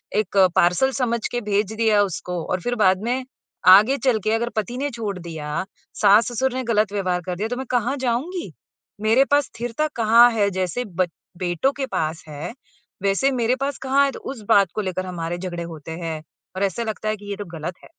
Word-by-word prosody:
एक 205 -2 0 0.2
पार्सल 180 +10 +3
समझ 235 -3 -1
के 245 - -2
भेज 205 -1 0
दिया 220 -2 +3
उसको 180 -2 -4
और 185 - -1
फ़िर 245 +3 -1
बाद 185 -1 +4
में 250 +2 -1 0.4
आगे 210 +9 +8
चल 245 -4 +3
के 215 - +1
अगर 235 +1 0
पति 220 +3 -2
ने 285 +2 -1
छोड़ 215 -5 -4
दिया, 160 -1 -4 0.4
सास-ससुर 230 +5 +4
ने 260 - -2
ग़लत 215 -3 +1
व्यवहार 185 -3 0
कर 180 - -3
दिया 205 +5 -2
तो 245 - -2
मैं 265 - -4
कहाँ 245 +2 +1
जाऊँगी? 265 +9 -2 0.5
मेरे 225 +5 +4
पास 290 -1 +4
स्थिरता 240 +6 -3
कहाँ 230 +1 +6
है 205 -3 +2
जैसे 185 +6 -2
बच 180 -2 -1 0.3
बेटों 180 +8 0
के 275 - -1
पास 160 -5 -2
है 155 +7 -6 0.5
वैसे 200 +8 +2
मेरे 245 -1 +1
पास 275 +1 -2
कहाँ 270 +1 +3
है? 275 - 0
तो - - -9
उस 265 -4 -7
बात 200 -1 +6
को 215 - 0
लेकर 185 -1 -3
हमारे 175 -1 -4
झगड़े 175 -2 -5
होते 160 -2 -8
हैं 160 -2 -4 0.3
और 190 - -1
ऐसा 200 +4 -1
लगता 215 -1 -3
है 215 - 0
कि 205 - -13
ये 200 - -2
तो 205 - -5
ग़लत 165 +3 -5
है। - - -31
215 Hz, 210 wpm, -22 LUFS, 185-245 Hz, 0.5 s, आगे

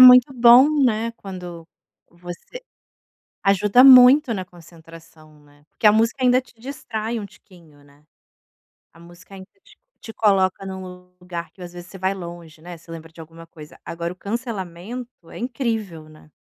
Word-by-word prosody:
muito 255 +1 +8
bom, 245 +2 +6 0.2
né. 230 -1 0
Quando 180 -6 -10 0.4
você 175 - -11 0.8
ajuda 200 +4 +4
muito 260 0 +7
na 190 -2 -5
concentração, 165 -3 -17
né. 145 0 -25
Que - - +2
a 210 - +7
música 225 +5 0
ainda 250 0 +4
te - - -23
distrai 235 -3 -5
um 210 - -6
tiquinho, 165 -7 -21
né, 145 +1 -24 0.9
a - - -21
música 175 +3 -17
ainda 190 -1 -12 0.2
t - - -22 0.2
te 225 - -11
coloca 195 -4 +1
num 185 -1 -9
lugar 175 -1 -8
que, - - -29
às 175 -1 -9
vezes, 175 0 -11
você 195 - -11
vai 190 +1 -1
longe, 170 -4 -11
né, 175 +1 -10
você 165 +1 -16
lembra 165 -1 -10
de 165 - -18
alguma 165 +1 -13
coisa. 155 -2 -15
Agora 170 0 -5
o - - -23
cancelamento 210 -1 -7
é - - -10
incrível, 225 - -4
né. 155 0 -19
185 Hz, 165 wpm, -21 LUFS, 170-230 Hz, 0.9 s, muito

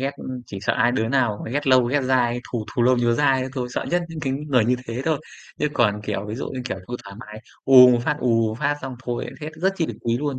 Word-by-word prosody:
ghét, 135 +1 -1 0.4
chỉ 100 - -7
sợ - - 0
ai 120 +2 +2
đứa 110 -3 0
nào 120 -5 +1
mà - - -6
ghét 145 +3 -2
lâu 130 -2 +5
ghét 140 +4 +1
dai, 125 -2 +1
thù 115 -3 -2
thù 120 - +1
lâu 125 +1 +4
nhớ 120 -1 +2
dai 135 -2 +2
đó 130 - -4
thôi, 125 -3 -3
sợ - - -3
nhất 175 +1 +1
những 160 -1 -7
cái 135 -2 -2
người 135 -4 +1
như 125 +2 +2
thế 120 +3 -3
thôi. 160 -2 +1 0.4
Chứ 150 - +1
còn, 105 -6 +2
kiểu, 105 -1 -3
ví 105 - -5
dụ 130 - -5
như 130 - -5
kiểu 120 - -4
thôi 125 - -3
thoải 100 0 -10
mái, 105 -2 -10 0.2
ù 125 -2 +9
một 120 - +3
phát, 150 0 0
ù 115 -2 +2
một 110 - -4
phát 145 0 +1
xong 130 -1 -6
thôi 120 -1 -3
lại - - -8
hết, 150 +1 -5
rất 190 +1 +3
chi 165 -3 0
được - - -6
quý 115 0 0
luôn, 145 -2 -2
125 Hz, 295 wpm, -23 LUFS, 115-140 Hz, 0.4 s, ù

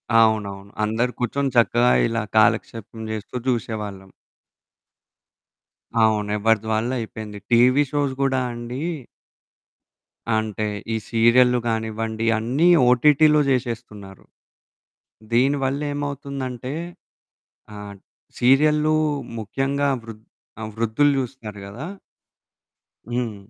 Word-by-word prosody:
అవునవును. 105 -3 +2
అందరూ 115 +4 0
కూర్చొని 135 +3 -1
చక్కగా 120 +1 +4 0.2
ఇలా 115 0 -1 0.2
కాలక్షేపం 110 +1 +1
జేస్తూ 110 +2 -6
జూసేవాళ్ళం. 105 -5 -3 1.9
అవును. 105 -1 +2
ఎవరదివాల్లయిపోయింది. 110 0 -1
టీవీ 125 +4 +5
షోస్ 145 -2 0
గూడా 135 -1 +1
అండి 120 +3 -6 1.5
అంటే 110 -1 -2 0.3
ఈ - - 0
సీరియల్లు 120 +2 +4
గానివ్వండి 110 0 -2
అన్నీ 130 +10 +2 0.2
ఓటిటి‌లో 150 +4 +5
జేశేస్తున్నారు. 115 -6 -4 1.1
దీని 135 +4 +3
వళ్ళేమవుతుందంటే, 140 -2 -4 1.0
ఆ - - -8 0.6
సీరియల్లు 150 +4 +4 0.5
ముఖ్యంగా 135 +6 -1
ఆ - - -7
వృద్ 110 -1 -11 0.4
ఆ - - -3
వృద్ధులు 115 +6 +2
జూస్తరు 115 -5 -6
గదా! 120 +11 -7 1.2
హ్మ్. 120 -3 -2
120 Hz, 85 wpm, -22 LUFS, 110-135 Hz, 1.9 s, టీవీ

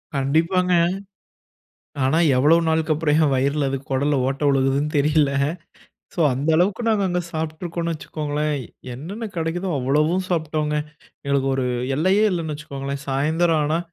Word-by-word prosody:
கண்டிப்பாங்க. 165 +7 +1 1.3
ஆனா, 135 +5 +2 0.2
எவ்வளவு 150 +6 +5
நாளுக்கு 160 0 +1
அப்புறம் 150 -1 +1
என் 150 -3 +3
வயிறுல 140 +2 +1
அது 135 - -2
குடல்ல 140 +2 +1
ஓட்ட 135 +2 -4
விழுகுதுன்னு 135 +2 +1
தெரியல. 150 0 +3 0.8
சோ, - - -14
அந்த 135 +5 -2
அளவுக்கு 185 +6 +1
நாங்க 215 -2 +2
அங்க 180 0 0
சாப்பிட்டு 160 0 -4
இருக்கோன்னு 170 -1 -2
வச்சுக்கோங்களேன். 150 0 -3 0.4
என்னென்ன 175 - -7
கிடைக்கிதோ, 170 +3 -2
அவ்வளவும் 150 +8 +1
சாப்பிட்டோம்ங்க. 155 -3 -1 0.5
எங்களுக்கு 140 -1 +1
ஒரு 130 -1 -1 0.3
எல்லையே 185 +7 +3
இல்லன்னு 165 -4 -2
வச்சுக்கோங்களேன். 140 -2 -6
சாயந்திரம் 155 +4 +1
ஆனா 155 +3 +1
155 Hz, 135 wpm, -22 LUFS, 140-165 Hz, 1.3 s, எவ்வளவு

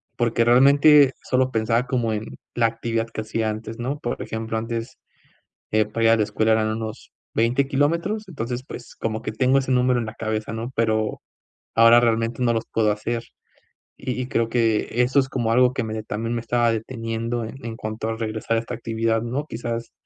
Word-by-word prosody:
Porque 115 -1 +1
realmente 140 +3 +6
solo 130 0 +1
pensaba 115 +2 +1
como 120 -3 0
en 110 0 -3 0.3
la 115 -1 +3
actividad 115 0 -2
que 110 - -5
hacía 110 0 -1
antes, 110 +2 -6
¿no? 130 +5 -2
Por 120 - -4
ejemplo, 110 0 -3
antes, 115 +3 -4 0.7
eh, 110 0 +3
para 115 +2 -3
ir - - +6
a - - +6
la 105 - +3
escuela 110 +2 +1
eran 110 0 +3
unos 110 -1 -7 0.2
20 120 +4 +2
kilómetros, 170 +10 0
entonces, 125 -6 -4
pues, 120 - -9
como 110 0 -3
que 110 - -4
tengo 130 +4 +2
ese 135 -1 0
número 125 0 +3
en 115 - -2
la 110 - -6
cabeza, 110 -1 -3
¿no? 115 +2 -4
Pero 110 -1 0 0.5
ahora 115 +1 +7
realmente 115 +1 0
no 120 -1 +3
los 115 - -1
puedo 110 -2 +2
hacer. 115 +3 -3 0.7
Y 130 - -4
y 125 - -4
creo 115 -3 0
que 115 -3 +1
eso 130 +3 +3
es 130 - +1
como 120 -4 -1
algo 125 +2 +4
que 130 - -1
me 110 0 -4
también 115 +2 -3
me 115 - -2
estaba 120 0 +2
deteniendo 115 +1 -3
e 110 - -6
en 115 -1 -5
cuanto 110 0 -5
a 115 - -2
regresar 110 0 -2
a - - +3
esta 115 +2 -5
actividad, 115 -1 -1
¿no? 130 +5 -3
Quizás, 115 0 -4
115 Hz, 200 wpm, -23 LUFS, 110-125 Hz, 0.7 s, ahora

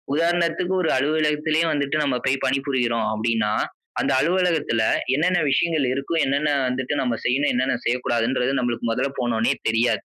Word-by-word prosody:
உதாரணத்துக்கு 175 +2 0
ஒரு - - +1
அலுவலகத்திலே 155 +2 +1
வந்துட்டு 140 +1 -1
நம்ம 130 -3 0
போய் 135 0 0
பணிபுரியிறோம் 130 -4 0
அப்பிடின்னா, 110 -1 0 0.5
அந்த - - 0
அலுவலகத்தில 165 -8 +1 0.3
என்னென்ன 175 +4 +2
விஷயங்கள் 155 -2 +1
இருக்கும்? 145 +4 -1
என்னென்ன 145 +2 0 0.2
வந்துட்டு 130 +2 -2
நம்ம 120 -3 -1
செய்யணும, 135 +4 +2
என்னென்ன 130 -1 0
செய்யக்கூடாதுன்றது 125 +1 0
நமக்கு 120 -1 -2
மொதல்ல 135 +3 -1
போனோனே 115 -2 +1 0.2
தெரியாது. 115 +2 +1
135 Hz, 135 wpm, -22 LUFS, 120-155 Hz, 0.5 s, என்னென்ன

